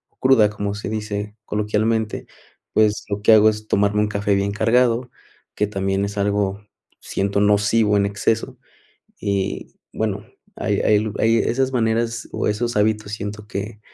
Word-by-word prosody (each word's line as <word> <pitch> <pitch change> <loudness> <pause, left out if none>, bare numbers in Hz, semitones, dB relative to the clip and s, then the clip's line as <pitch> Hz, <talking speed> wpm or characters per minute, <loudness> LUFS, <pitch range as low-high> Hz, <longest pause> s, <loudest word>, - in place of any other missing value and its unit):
o - - -56
cruda, 130 -5 +5
como 105 -1 -3
se 105 -1 -5
dice 105 -1 -4
coloquialmente, 105 +1 -1 0.5
pues, 110 -1 +2
lo 100 0 -3
que 110 - +7
hago 110 0 +7
es 110 0 -5
tomarme 100 0 +2
un 105 - +1
café 100 -1 0
bien 100 +1 0
cargado, 120 +3 +2 0.5
que 105 - +1
también 95 -1 -1
es 100 +1 -6
algo 100 0 0 0.4
siento 100 +1 -1
nocivo 105 +1 +3
en 100 - +2
exceso 100 +3 -1 0.6
y 100 -1 -2 0.2
bueno, - - -2 0.3
hay - - -1
hay 105 0 +2
hay 115 +1 +3
esas 130 +3 0
maneras, 115 -1 0
o - - -2
esos 120 +3 -1
hábitos 105 0 +1
siento 105 0 -6
que 105 +2 -5
105 Hz, 155 wpm, -21 LUFS, 100-110 Hz, 0.6 s, que